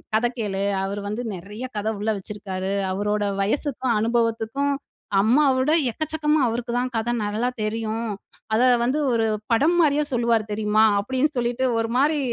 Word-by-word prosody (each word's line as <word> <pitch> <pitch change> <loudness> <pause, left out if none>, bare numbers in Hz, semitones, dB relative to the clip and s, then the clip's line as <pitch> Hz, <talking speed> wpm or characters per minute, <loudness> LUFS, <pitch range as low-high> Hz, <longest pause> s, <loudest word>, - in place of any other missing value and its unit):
கத 220 +2 +2
கேளு! 200 -3 -2 0.2
அவரு 200 +1 -3
வந்து 215 +4 -3
நிறைய 205 +7 -7
கதை 210 +2 -1
உள்ள 215 +2 -1
வச்சுருக்காரு. 195 -1 -5 0.2
அவரோட 205 +2 -1 0.2
வயசுக்கும் 250 +3 0
அனுபவத்துக்கும் 230 +4 0 0.5
அம்மா 245 +8 +4
விட 260 +4 +2 0.2
எக்கச்சக்கமா 310 +2 0
அவருக்கு 235 +1 -3
தான் 250 0 -2
கதை 230 +2 -1
நல்லா 215 +4 -1
தெரியும். 225 +1 -2 0.5
அத 220 - +3 0.2
வந்து 260 +5 +1
ஒரு 225 -1 +2 0.3
படம் 300 +9 +3
மாரியே 300 -1 +3
சொல்லுவாரு 235 -2 +2
தெரியுமா?" 215 +1 +3
அப்பிடின்னு 260 +7 0
சொல்லிட்டு 245 +2 0
ஒருமாரி 260 +7 +1
230 Hz, 140 wpm, -23 LUFS, 210-260 Hz, 0.5 s, அம்மா